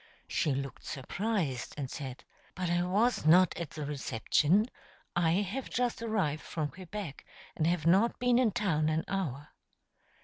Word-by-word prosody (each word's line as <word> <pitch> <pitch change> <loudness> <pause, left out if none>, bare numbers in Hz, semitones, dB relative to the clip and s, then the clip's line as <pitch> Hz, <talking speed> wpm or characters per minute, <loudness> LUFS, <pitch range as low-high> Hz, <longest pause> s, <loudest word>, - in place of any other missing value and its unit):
She 145 -4 +1
looked 135 0 -5
surprised, 160 - -2
and 140 -3 -3
said: 130 -3 -6 0.3
"But 180 -1 -1
I 175 0 +2
was 205 +7 +2
not 175 +3 +6
at 170 -4 -4
the 150 -2 -5
reception. 150 - +2 0.5
I 170 -2 +3
have 205 +7 -1
just 245 -1 -1
arrived 195 -10 0
from 155 -3 -3
Quebec, 185 -4 -7 0.3
and 160 - +1
have 170 -3 0
not 195 +8 +4
been 245 0 +3
in 250 -3 +4
town 170 -8 +1
an 155 +1 0
hour." 150 -7 -3
175 Hz, 150 wpm, -31 LUFS, 150-205 Hz, 0.5 s, not